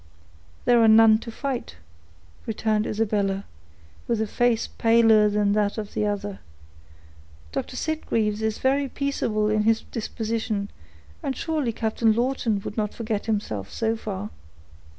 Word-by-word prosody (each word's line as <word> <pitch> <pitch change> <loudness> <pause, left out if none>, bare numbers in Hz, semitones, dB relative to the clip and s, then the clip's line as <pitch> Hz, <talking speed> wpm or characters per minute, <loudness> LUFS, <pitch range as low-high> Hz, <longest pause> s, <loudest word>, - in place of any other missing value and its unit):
"There 240 -1 +5
are 225 - +6
none 220 0 +7
to 230 - -8
fight," 260 - -4 0.7
returned 215 -1 0
Isabella, 200 -2 0 0.6
with 235 -2 0
a 220 - +1
face 235 +1 +1
paler 225 -2 +4
than 205 -1 +1
that 205 0 +1
of 210 -2 -5
the 210 - 0
other. 205 -1 -3 1.1
"Dr. 255 - -4
Sitgreaves 225 -9 -1
is 220 0 -1
very 275 +1 +1
peaceable 235 -7 -1
in 215 0 +2
his 225 +1 +2
disposition, 220 -2 -3 0.5
and 270 - -2
surely 310 -7 -1
Captain 220 0 +1
Lawton 235 -3 0
would 205 - -7
not 210 -1 -1
forget 220 -2 -3
himself 110 - -2
so 225 0 0
far." 210 -2 -5
220 Hz, 135 wpm, -25 LUFS, 210-230 Hz, 1.1 s, none